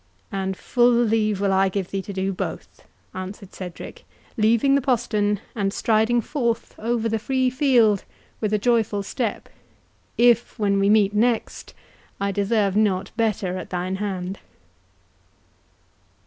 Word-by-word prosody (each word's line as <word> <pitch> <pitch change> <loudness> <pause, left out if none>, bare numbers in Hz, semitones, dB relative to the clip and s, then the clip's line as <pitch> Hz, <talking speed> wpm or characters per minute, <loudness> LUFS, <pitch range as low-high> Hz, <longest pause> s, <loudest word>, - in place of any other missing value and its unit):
"And 190 -1 -3
full 245 -1 +3
leave 220 -3 +1
will 200 -1 +1
I 190 0 +3
give 190 -1 -3
thee 195 - -2
to 200 - -8
do 195 0 -2
both," - - -6 0.3
answered 185 +1 -8
Cedric, 180 -2 -8 0.3
leaving 230 +5 +3
the 280 - +3
postern, 210 -6 0
and 200 -3 -1
striding 220 +3 +2
forth 235 -3 -2
over 230 0 -1
the 225 0 -1
free 260 +2 0
field 245 -7 +3 0.4
with 215 -2 -1
a 210 - +3
joyful 220 -2 +1
step, 225 +2 -3 0.7
"if, 240 0 +3
when 200 -2 +1
we 195 0 +3
meet 210 -1 +4
next, 230 +2 -1 0.4
I 200 0 0
deserve 200 0 +1
not 200 -2 +1
better 205 -5 -1
at 180 - -8
thine 185 +1 -2
hand." 190 -2 -4
210 Hz, 140 wpm, -23 LUFS, 195-230 Hz, 0.7 s, meet